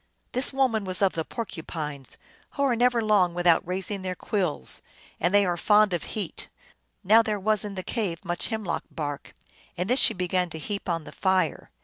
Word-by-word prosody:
289 255 - 0
This - - +3
woman 260 -6 +1
was 185 0 -1
of 195 - +3
the 160 - -2
Porcupines, 155 - -6 0.4
who 280 - -1
are 260 -3 +3
never 240 0 +3
long 195 -5 +3
without 175 -2 +4
raising 190 +2 -3
their 185 -1 -3
quills, 180 - -2 0.4
and 175 - +1
they 205 0 +5
are 175 -1 0
fond 210 +2 +4
of 175 - -2
heat. 205 -6 -4 0.5
Now 220 +4 +6
there 215 -2 -2
was 215 +1 +2
in 205 -2 -5
the 185 - -4
cave 195 -6 -3
much 175 -1 -2
hemlock 220 -6 -3
bark, 145 -2 -5 0.4
and 180 +2 -1
this 250 +4 +3
she - - +6
began 180 0 0
to 160 - -7
heap 200 +5 -5
on 165 -2 -1
the - - -10
fire. 190 -1 0
190 Hz, 200 wpm, -26 LUFS, 175-215 Hz, 0.5 s, Now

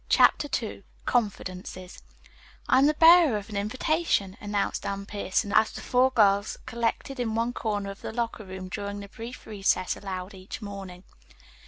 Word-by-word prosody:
CHAPTER 290 - +5 0.2
II 210 - -7 0.2
CONFIDENCES 185 -5 -2 0.7
"I 255 - +5
am 275 - +6
the 305 - +2
bearer 325 -6 +7
of 205 +1 -8
an - - -6
invitation," 215 - 0
announced 205 -1 -1
Anne 200 0 -3
Pierson 200 0 -1
as 220 - +5
the - - -8
four 255 +1 +3
girls 205 -4 +3
collected 235 +3 -2
in 225 -3 -1
one 230 +2 0
corner 205 -4 -2
of 195 - -12
the - - -5
locker 230 -1 -3
room 190 -1 -7
during 200 +2 -5
the 200 - -9
brief 235 +4 -9
recess 195 -3 0
allowed 190 0 -6
each 190 0 -8
morning. 195 -4 -8
205 Hz, 165 wpm, -27 LUFS, 195-235 Hz, 0.7 s, bearer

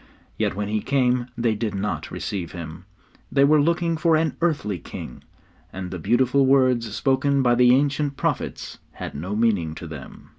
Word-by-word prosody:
Yet - - -1
when 105 0 -2
He 105 0 -1
came 125 -2 +1
they 115 -2 +1
did 105 -1 -3
not 95 -6 -3
receive 90 -5 -5
Him. 80 -3 -8 0.5
They 140 - +4
were 150 +1 +5
looking 170 +1 +1
for 165 0 +3
an 160 -1 +1
earthly 140 - 0
king, 60 - -9 0.5
and 90 -1 -6
the 95 - -5
beautiful 125 - +2
words 130 -4 +3
spoken 135 0 +2
by 120 -1 +4
the 125 +1 +5
ancient 140 0 0
prophets - - -3
had - - -7
no 90 +8 -4
meaning 100 -9 +1
to 85 - -8
them. 75 -5 -10
120 Hz, 175 wpm, -23 LUFS, 100-140 Hz, 0.5 s, were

